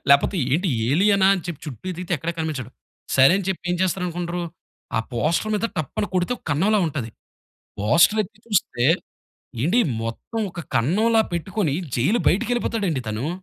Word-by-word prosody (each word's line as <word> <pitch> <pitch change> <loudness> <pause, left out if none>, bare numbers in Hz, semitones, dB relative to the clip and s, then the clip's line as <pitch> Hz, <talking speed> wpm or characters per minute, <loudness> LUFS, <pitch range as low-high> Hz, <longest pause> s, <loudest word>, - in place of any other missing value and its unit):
లేకపోతే 140 +7 +5 0.2
ఏంటి 180 +4 +2 0.2
ఏలియనా 195 +6 +4
అని 180 - -4
చెప్పి 170 -5 -6
చుట్టూ 130 - -8
ఎతికితే 180 +1 -5
ఎక్కడ 165 +3 -3
కనిపించడు. 145 -7 -3 0.5
సరే 135 +4 +7
అని 200 - -4
చెప్పి 190 - -2
ఏం - - 0
చేస్తారనుకుంటరు. 175 -1 -2 0.5
ఆ - - +3
పోస్టర్ 165 - 0
మీద 210 +2 +1
టప్ 155 -5 -3
అని 205 - -1
కొడితే 180 +6 +1
ఒక - - -25
కన్నంలా 195 +9 +3
ఉంటాది. 135 -7 -4 0.7
పోస్టర్ 165 - +4
ఎత్తి 215 +3 -18
చూస్తే 180 - 0 0.8
ఏండి, 180 - +3 0.2
మొత్తం 115 - -5
ఒక 175 - -6 0.2
కన్నంలా 220 - +3
పెట్టుకొని 175 -3 -1 0.2
జైలు 190 - +2
బయటికెళ్ళిపోతాడండి 210 - 0
తను. 115 +8 -2
175 Hz, 150 wpm, -23 LUFS, 145-205 Hz, 0.8 s, సరే